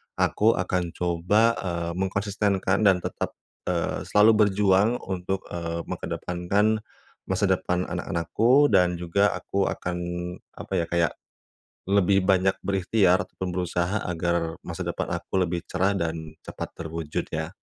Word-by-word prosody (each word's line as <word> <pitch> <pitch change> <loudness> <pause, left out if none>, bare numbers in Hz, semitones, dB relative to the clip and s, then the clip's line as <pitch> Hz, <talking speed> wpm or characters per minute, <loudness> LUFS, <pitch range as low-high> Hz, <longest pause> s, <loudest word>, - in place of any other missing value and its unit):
aku 110 +2 +3
akan 90 -2 -1
coba, 90 +4 +1 0.2
eee, 85 -2 -3
mengkonsistenkan 100 0 0
dan 95 - +5
tetap, - - -3 0.3
eee, 85 -2 -1
selalu 105 0 +5
berjuang 100 +1 +3
untuk, 95 0 -3
eee, 85 -1 -3
mengedepankan 100 +5 0 0.5
masa 95 +2 -1
depan 90 -1 +1
anak-anakku 115 - +2
dan 90 -3 +4
juga 90 +4 +1
aku 100 -1 -1
akan, 90 0 -3 0.6
apa - - -8
ya, 85 - 0
kayak 85 -1 +2 0.8
lebih 100 -1 +4
banyak 95 0 +3
berikhtiar 95 -1 +3
ataupun 95 0 -6
berusaha 90 +2 -1
agar 85 -1 -1
masa - - -5
depan - - -3
aku 95 - -2
lebih 85 0 -2
cerah 95 +2 +1
dan 80 -3 -4
cepat - - -5
terwujud 80 -2 -4
ya. - - -2
90 Hz, 130 wpm, -25 LUFS, 85-100 Hz, 0.8 s, dan